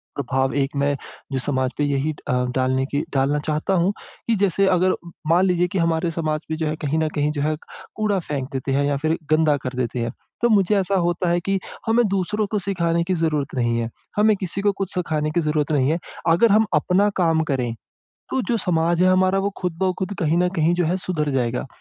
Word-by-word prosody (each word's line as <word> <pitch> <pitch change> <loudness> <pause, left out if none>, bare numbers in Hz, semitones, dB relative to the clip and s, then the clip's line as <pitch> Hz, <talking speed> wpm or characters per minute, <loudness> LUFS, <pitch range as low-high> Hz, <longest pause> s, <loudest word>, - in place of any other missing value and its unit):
प्रभाव 130 0 0
एक 135 - 0
मैं 140 0 +1 0.4
जो 130 - -1
समाज 130 -1 -1
पे 145 - +1
यही 145 +2 0
ड - - -18
अ, - - 0 0.2
डालने 130 0 +1
की 145 +2 -2
डालना 140 +2 +2
चाहता 155 +5 0
हूँ 195 +3 +1 0.3
कि 230 - +3
जैसे 195 -1 +2
अगर 185 0 +3 0.3
मान 175 +3 +4
लीजिए 180 -1 +2
कि - - +3
हमारे 165 0 +1
समाज 155 -2 -2
में 160 - -1
जो 160 -1 -1
है, 155 - -1
कहीं 150 0 -2
न 160 - +1
कहीं 150 0 +1
जो 145 - -3
है, 155 +1 +1 0.4
कूड़ा 210 -3 +1
फेंक 140 -2 -2
देते 135 +1 -2
हैं 140 +1 +2
या 145 -1 +1
फिर 160 +1 +1
गंदा 155 -2 +4
कर 130 - -3
देते 125 -1 -2
हैं, 115 0 -1 0.3
तो 240 - +3
मुझे 205 -1 +3
ऐसा 195 +1 0
होता 175 0 0
है 175 +1 +2
कि 195 +2 -1 0.3
हमें 230 +1 +3
दूसरों 195 +2 0
को 210 - +1
सिखाने 170 -3 0
की 185 +2 -1
ज़रूरत 155 -5 -1
नहीं 120 -2 +1
है। 115 0 -2 0.3
हमें 215 0 +5
किसी 190 +1 -3
को 205 0 +3
कुछ 190 - -2
सिखाने 155 -4 -1
की 170 - +1
ज़रूरत 150 -1 0
नहीं 140 -1 +2
है। 165 - +1 0.3
अगर 195 +7 +5
हम 220 +1 +5
अपना 200 +3 +3
काम 160 -1 +3
करें, 125 -3 -1 0.6
तो 265 - 0
जो 235 - +2
समाज 170 -2 +1
है 185 - +5
हमारा, 185 +1 +3
वो 200 +1 0
खुद-ब-खुद 185 +2 -2
कहीं 165 +1 +1
न 180 0 +3
कहीं 160 +1 +3
जो 175 -1 +1
है 180 +3 +1
सुधर 155 -6 -2
जाएगा। 125 -2 -1
165 Hz, 225 wpm, -22 LUFS, 145-185 Hz, 0.6 s, हमें